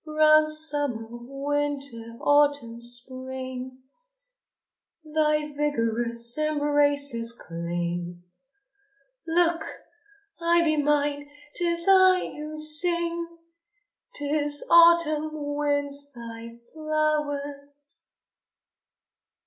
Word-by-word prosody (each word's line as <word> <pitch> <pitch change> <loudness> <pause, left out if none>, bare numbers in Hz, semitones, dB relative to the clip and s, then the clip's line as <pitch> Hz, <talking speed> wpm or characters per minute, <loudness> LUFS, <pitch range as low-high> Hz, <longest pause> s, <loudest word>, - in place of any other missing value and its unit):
Round 310 0 +4
Summer, 290 -7 -2
Winter, 275 -2 -4
Autumn, 285 -5 +2
Spring, 255 +1 -4 1.2
Thy 305 -1 0
vigorous 235 -4 -1
embraces 290 -5 +1
cling. 175 -1 -5 1.0
Look! 335 0 +1 0.8
Ivy 335 -2 +2
mine, 290 0 0 0.2
'tis 340 0 +2
I 375 -1 +5
who 305 +1 -7
sing, 335 +2 +2 0.9
'Tis 290 0 -1
Autumn 335 -2 +5
wins 285 -1 -3
thy 230 0 -9 0.2
flowers! 290 -2 -3
290 Hz, 65 wpm, -25 LUFS, 255-310 Hz, 1.2 s, I